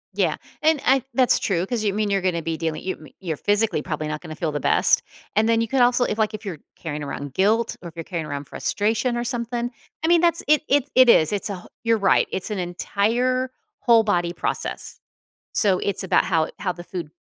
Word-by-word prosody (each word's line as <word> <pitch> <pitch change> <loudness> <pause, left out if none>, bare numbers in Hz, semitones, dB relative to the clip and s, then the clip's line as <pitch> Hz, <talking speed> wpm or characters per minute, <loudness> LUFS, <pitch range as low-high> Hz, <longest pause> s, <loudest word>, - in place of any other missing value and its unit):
Yeah. - - +1 0.2
And 315 -1 +3
I 265 -1 +4
that's 255 -2 +4
true 180 -2 0
'cause 230 0 -2
you 205 - +2
mean 210 -1 0
you're 195 -1 +1
gonna 170 -3 0
be 165 -1 -2
dealing 160 -1 -3
you 185 - -2
me 155 -4 -15
you're 170 -5 -3
physically 205 -5 +1
probably 155 - -3
not 150 0 -4
gonna 160 -3 -8
feel 160 -1 -2
the 145 - -2
best. - - +3 0.3
And 220 +2 +3
then 230 0 +3
you 230 - 0
could, 265 +2 +1
also 245 0 +4
if, 210 - -1
like, 215 0 +1
if 215 - -10
you're 175 -7 -5 0.2
carrying 150 -2 -5
around 140 -1 -6
guilt 215 +5 +2
or 170 - -7
if 165 - -19
you're 165 - -5
carrying 165 -4 -4
around 145 0 -5
frustration 220 - -1
or 240 - -1
something, 240 0 -2 0.3
I - - +2
mean, 340 0 +5
that's 340 -1 +2
it 305 0 +5
it's 285 0 +2
it 255 -2 +6
is. 155 -6 +6
It's 205 +1 -2
a 200 - -3
who 180 - -13 0.2
you're 230 0 +3
right, 200 -2 +3
it's 190 - -2
an 205 - -2
entire 230 +8 0 0.3
whole 230 -2 +5
body 175 -5 0
process. - - -3 0.5
So, 195 -4 +2
it's 200 0 0
about 190 - +3
how 165 -4 +1
how 185 - -1
the 175 0 -10
food 175 -5 -6
205 Hz, 235 wpm, -23 LUFS, 170-240 Hz, 0.5 s, it